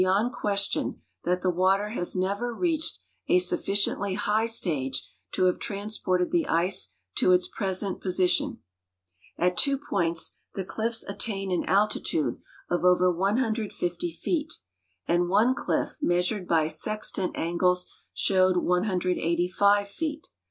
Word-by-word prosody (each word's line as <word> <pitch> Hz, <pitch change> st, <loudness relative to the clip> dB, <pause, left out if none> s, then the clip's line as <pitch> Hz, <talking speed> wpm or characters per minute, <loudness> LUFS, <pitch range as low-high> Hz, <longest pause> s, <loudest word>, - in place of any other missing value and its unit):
yond 200 Hz, +7 st, +2 dB
question 200 Hz, -4 st, -1 dB, 0.3 s
that 180 Hz, +1 st, 0 dB
the 185 Hz, -, +3 dB
Avater 190 Hz, +4 st, +2 dB
has 180 Hz, -6 st, -2 dB
never 200 Hz, +6 st, -1 dB
reached 325 Hz, -1 st, 0 dB, 0.3 s
a -, -, +5 dB
sufficiently 195 Hz, +1 st, +1 dB
high 210 Hz, +2 st, +1 dB
stage 150 Hz, -, -1 dB, 0.2 s
to -, -, 0 dB
have 180 Hz, -, +2 dB
transi>orted 200 Hz, -3 st, -1 dB
the 335 Hz, -4 st, +1 dB
ice 170 Hz, -, 0 dB, 0.2 s
to 185 Hz, -, +3 dB
its 180 Hz, 0 st, +3 dB
present 190 Hz, -1 st, -2 dB
position. 180 Hz, -1 st, +1 dB, 0.8 s
At 180 Hz, +1 st, +1 dB
tAvo 275 Hz, +8 st, +3 dB
points 165 Hz, -1 st, 0 dB, 0.2 s
the 195 Hz, -, -2 dB
cliffs 225 Hz, +3 st, -1 dB
attain 195 Hz, -1 st, -3 dB
an 180 Hz, -, 0 dB
altitude 195 Hz, -, +1 dB, 0.3 s
of 175 Hz, -, 0 dB
OA'er 180 Hz, 0 st, +4 dB
150 200 Hz, -3 st, -1 dB
feet, 310 Hz, -, -2 dB, 0.6 s
and 175 Hz, +1 st, +2 dB
one 215 Hz, +7 st, +4 dB
cliff 270 Hz, -, -2 dB
measured 180 Hz, -2 st, 0 dB
b}'' 160 Hz, -2 st, +3 dB
sextant 200 Hz, +2 st, -1 dB
angles 180 Hz, +2 st, +1 dB, 0.3 s
showed 185 Hz, -1 st, +2 dB
185 180 Hz, +2 st, +1 dB
feet. 305 Hz, -, -4 dB
185 Hz, 125 wpm, -27 LUFS, 180-210 Hz, 0.8 s, a